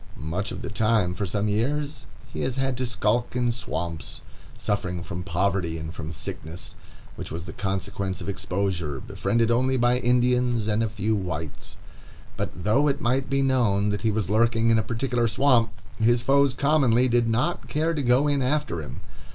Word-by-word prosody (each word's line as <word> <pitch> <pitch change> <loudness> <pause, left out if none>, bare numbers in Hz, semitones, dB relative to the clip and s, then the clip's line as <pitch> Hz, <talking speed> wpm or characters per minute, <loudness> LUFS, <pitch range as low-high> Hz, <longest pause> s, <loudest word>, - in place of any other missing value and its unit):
Much 85 +9 -3
of - - -6
the - - -4
time 110 -4 +2
for 100 +2 -3
some 105 +3 -1
years 135 +5 -1 0.3
he - - -3
has 130 - -1
had 135 -1 0
to 125 0 -2
skulk 120 +1 0
in 120 -1 +2
swamps, 85 -8 -5 0.3
suffering 90 -4 -2
from 90 0 -5
poverty 90 -1 0
and 80 0 -6
from 80 -1 -6
sickness, 80 +3 -5 0.4
which - - -6
was 85 +1 -5
the 85 - -8
consequence 95 -1 -3
of - - -7
exposure, 90 -7 -2
befriended 115 0 0
only 130 +2 +2
by 120 +1 +3
Indians 125 -2 +2
and 110 +1 +1
a 115 - 0
few 110 0 -1
whites. 85 -6 -5 0.6
But 90 - -4
though 125 +8 +3
it 140 0 +1
might 130 +2 0
be 135 0 +2
known 115 -7 +2
that 105 0 -1
he 110 - +2
was 105 -3 0
lurking 115 +2 +3
in 115 - +4
a - - +3
particular 120 +2 0
swamp, 120 -1 +3 0.3
his 120 +1 +3
foes 140 0 +3
commonly 130 -4 +3
did 120 -1 +2
not 120 +10 0
care 160 +2 0
to 150 - -1
go 130 +3 +3
in 145 -1 +1
after 140 - 0
him. 65 -5 -8
115 Hz, 185 wpm, -25 LUFS, 95-125 Hz, 0.6 s, in